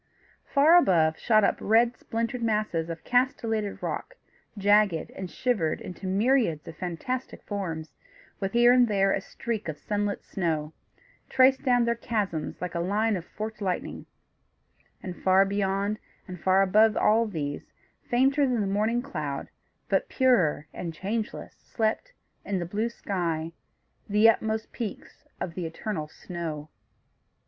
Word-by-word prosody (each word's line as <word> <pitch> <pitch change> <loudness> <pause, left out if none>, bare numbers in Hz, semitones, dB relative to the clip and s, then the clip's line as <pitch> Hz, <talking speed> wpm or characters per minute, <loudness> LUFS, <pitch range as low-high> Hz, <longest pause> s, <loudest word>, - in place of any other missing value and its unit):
Far 300 +5 +5
above, 165 - +3
shot 215 -2 +4
up - - +2
red 235 +3 +3
splintered 230 +2 -3
masses 210 -7 0
of 165 -1 -6
castellated 225 -5 0
rock, - - -4 0.4
jagged 200 -4 +3
and 190 -2 -7
shivered 170 -4 0
into 185 +1 -7
myriads 205 - +1
of 165 - -8
fantastic 185 +10 -4
forms, 165 -7 -4 0.5
with 195 -1 -3
here 240 +1 +6
and 250 -1 +5
there 195 -2 +2
a 195 - 0
streak 220 0 -5
of 155 -2 -4
sunlit 205 +4 -2
snow, 160 -4 -2 0.6
traced 265 0 +5
down 245 -3 +3
their 235 - +2
chasms 210 -9 -3
like 180 0 -4
a 170 - -2
line 210 +5 +1
of 175 -2 -5
forked 215 +3 -7
lightning; 185 -3 -3 1.0
and, 180 -4 -7
far 190 +1 +5
beyond, 200 +1 -1 0.3
and 180 -2 -8
far 190 +1 +4
above 215 +3 +4
all 225 +2 +3
these, 145 -7 -5 0.4
fainter 270 +3 +3
than 245 -3 +1
the - - 0
morning 215 +5 0
cloud, 150 - -4 0.4
but - - +1
purer 195 - +2
and 170 -2 -5
changeless, 210 +6 -4
slept, 225 - -2 0.3
in 200 - -2
the 175 - -2
blue 210 +6 -1
sky, 170 -7 -3 0.6
the 210 +2 +5
utmost 220 0 +1
peaks 225 -5 -7
of 170 - -4
the 175 -1 -3
eternal 160 -1 -4
snow. 155 -2 -6
205 Hz, 145 wpm, -27 LUFS, 175-230 Hz, 1.0 s, here